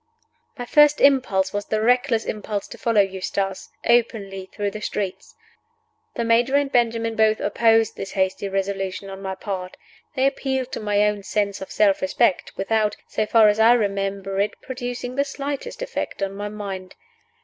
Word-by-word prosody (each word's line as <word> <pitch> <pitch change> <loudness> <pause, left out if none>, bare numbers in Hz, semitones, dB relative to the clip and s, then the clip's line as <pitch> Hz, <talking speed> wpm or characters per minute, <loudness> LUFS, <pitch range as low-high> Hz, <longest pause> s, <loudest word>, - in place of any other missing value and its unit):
MY 245 - -5
first 295 +3 +5
impulse 250 -9 +3
was 205 0 -2
the 215 - -1
reckless 245 0 +2
impulse 210 -1 -4
to 235 - -9
follow 225 -2 +3
Eustace 195 0 -3 0.2
openly 205 -5 +1
through 205 -1 -2
the 215 - -7
streets. 195 -3 -4 0.8
The 235 - -1
Major 235 +4 +3
and 285 -1 +2
Benjamin 230 -2 +1
both 220 0 +3
opposed 225 +1 +2
this 195 - -6
hasty 190 +1 -1
resolution 195 0 -3
on 195 0 -8
my 190 -1 -4
part. 185 -2 -5 0.4
They 265 -1 +2
appealed 265 -2 -1
to - - -4
my 210 -1 +2
own 210 -1 -1
sense 200 0 -2
of 190 - -7
self 200 -2 +2
respect, 190 +1 +1
without 210 +1 0
(so 215 - -1
far 220 0 +6
as 210 +1 +2
I 225 +2 +7
remember 195 -3 -1
it) 205 +1 -1
producing 250 0 -5
the 280 - +3
slightest 285 - -5
effect - - -4
on 195 0 -2
my 205 +1 -5
mind. 195 -3 -7
210 Hz, 170 wpm, -23 LUFS, 195-240 Hz, 0.8 s, I